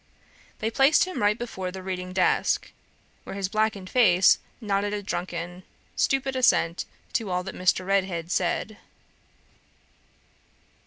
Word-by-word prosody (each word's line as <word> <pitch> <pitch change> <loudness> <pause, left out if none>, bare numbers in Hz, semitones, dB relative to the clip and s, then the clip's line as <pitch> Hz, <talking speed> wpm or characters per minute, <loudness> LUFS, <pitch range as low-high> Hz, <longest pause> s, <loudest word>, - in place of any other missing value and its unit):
They 220 +1 -2
placed 270 +5 +5
him 370 -8 -4
right 205 +1 +3
before 190 -6 -5
the 190 +1 -8
reading 185 -1 -4
desk, 185 0 +1 0.5
where - - -7
his 195 -1 -2
blackened 215 -2 0
face 190 -5 +5 0.2
nodded 205 -2 -1
a 205 - -5
drunken, 175 -1 -4 0.3
stupid 270 0 +1
assent 185 -9 +2 0.3
to 220 -4 -1
all 180 0 -1
that 190 - -6
Mr. 185 0 +1
Redhead 185 -3 0
said. 190 +4 -1
195 Hz, 125 wpm, -26 LUFS, 180-220 Hz, 0.5 s, placed